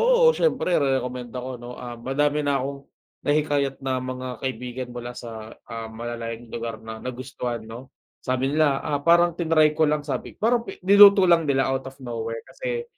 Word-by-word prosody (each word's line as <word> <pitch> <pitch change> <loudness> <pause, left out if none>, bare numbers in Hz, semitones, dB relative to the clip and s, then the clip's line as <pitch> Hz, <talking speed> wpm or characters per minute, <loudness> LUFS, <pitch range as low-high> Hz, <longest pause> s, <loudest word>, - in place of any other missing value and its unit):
oo 485 +1 +5
siyempre 330 - +2
irerekomenda 125 -2 -1
ko 130 -1 -5
'no. 120 +1 -8
Ah, 120 -1 -7
madami 145 +4 0
na 140 -2 +1
akong 140 +1 -5 0.4
nahikayat 145 -2 +1
na 130 -1 -1
mga 130 -1 -5
kaibigan 125 0 -4
mula 120 0 -7
sa, 110 -2 -8
ah, 115 -1 -6
malalayong 115 0 -6
lugar 115 -1 -4
na 110 0 -7
nagustuhan 125 -2 -5
'no. 120 +4 -10 0.3
Sabi 130 +2 -1
nila, 150 -3 +3
ah, 145 -1 -1
parang 170 +3 +5
tinry 160 -3 +3
ko 155 -1 +3
lang 150 -1 0
sabi - - -4
parang 230 +2 +2 0.2
niluto 200 0 +8
lang 170 -2 +5
nila 135 -1 +2
out 135 0 -4
of 135 - -20
nowhere, 115 -1 -4
kasi - - -4
130 Hz, 170 wpm, -24 LUFS, 120-150 Hz, 0.4 s, niluto